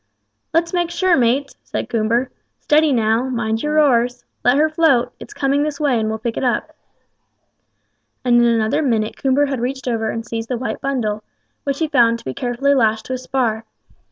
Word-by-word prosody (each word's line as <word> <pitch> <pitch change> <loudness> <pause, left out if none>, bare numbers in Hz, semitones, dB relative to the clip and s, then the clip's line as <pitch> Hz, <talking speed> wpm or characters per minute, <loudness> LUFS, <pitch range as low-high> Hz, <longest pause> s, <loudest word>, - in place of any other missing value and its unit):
"Let's 335 +2 +1
make 350 -1 0
sure, 365 0 +2
mates," 265 +3 +1
said - - -4
Coomber. 235 +3 0 0.3
"Steady, 305 0 +3
now; 225 0 +2
mind 225 -3 -1
your 300 +1 +1
oars; 245 -4 +2 0.2
let 245 +3 +4
her 310 +2 +4
float; 310 -6 +2
it's - - -11
coming 280 -6 0
this 295 -1 -2
way, 275 -6 +2
and 220 0 -1
we'll 220 - -2
pick 230 +1 -4
it - - -2
up;" 245 -2 0 1.5
and 240 -1 +4
in 240 - +5
another 225 +3 +1
minute 225 -6 0
Coomber 270 +2 +2
had 275 -3 -3
reached 260 +2 -3
over 225 -2 -1
and 230 0 -4
seized 230 -1 -5
the 250 - -1
white 230 -2 -4
bundle, 220 -6 -2 0.4
which 280 -1 -1
he 320 - 0
found 235 -5 +3
to - - -16
be 130 - -3
carefully 250 - 0
lashed 220 -4 +1
to 260 - -4
a - - -1
spar. 245 -4 -1
250 Hz, 195 wpm, -19 LUFS, 230-280 Hz, 1.5 s, in